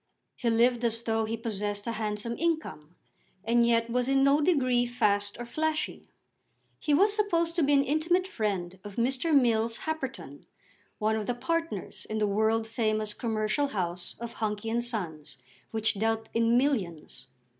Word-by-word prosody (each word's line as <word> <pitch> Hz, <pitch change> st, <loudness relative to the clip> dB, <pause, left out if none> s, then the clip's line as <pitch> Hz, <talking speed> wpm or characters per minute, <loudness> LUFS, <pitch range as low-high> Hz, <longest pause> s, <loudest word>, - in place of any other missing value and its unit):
He 240 Hz, -, -1 dB
lived 240 Hz, +1 st, +3 dB
as 230 Hz, 0 st, 0 dB
though 225 Hz, -1 st, 0 dB
he 225 Hz, +1 st, -3 dB
possessed 205 Hz, -2 st, -3 dB
a 230 Hz, -, -1 dB
handsome 215 Hz, +1 st, -2 dB
income, 315 Hz, -, -2 dB, 0.5 s
and 235 Hz, +1 st, +4 dB
yet 230 Hz, -1 st, +3 dB
was 250 Hz, +2 st, 0 dB
in 270 Hz, 0 st, +4 dB
no 280 Hz, +2 st, +4 dB
degree 255 Hz, -7 st, +2 dB
fast 205 Hz, -4 st, 0 dB
or 240 Hz, -, -4 dB
flashy. 310 Hz, +5 st, -2 dB, 0.7 s
He 300 Hz, -, -2 dB
was 400 Hz, +8 st, +4 dB
supposed 340 Hz, -6 st, +1 dB
to -, -, +3 dB
be 290 Hz, -1 st, +3 dB
an 275 Hz, -1 st, +5 dB
intimate 335 Hz, +6 st, +1 dB
friend 190 Hz, -, -3 dB
of 205 Hz, -1 st, -9 dB
Mr. 260 Hz, +7 st, 0 dB
Mills 230 Hz, -5 st, +3 dB
Happerton, 255 Hz, -, -5 dB, 0.5 s
one 215 Hz, +1 st, +1 dB
of 215 Hz, -2 st, -3 dB
the 245 Hz, -, 0 dB
partners 330 Hz, +6 st, -3 dB
in 215 Hz, -, -2 dB
the 215 Hz, -, +2 dB
world 220 Hz, +2 st, +1 dB
famous 215 Hz, -2 st, -1 dB
commercial 220 Hz, +5 st, 0 dB
house 180 Hz, -6 st, -3 dB
of 235 Hz, 0 st, -6 dB
Hunky 215 Hz, +1 st, -2 dB
and 235 Hz, +1 st, 0 dB
Sons, 160 Hz, -, -3 dB, 0.3 s
which 220 Hz, -1 st, 0 dB
dealt 225 Hz, +2 st, -1 dB
in 230 Hz, +1 st, +3 dB
millions. 185 Hz, -, -1 dB
230 Hz, 165 wpm, -28 LUFS, 215-270 Hz, 0.7 s, an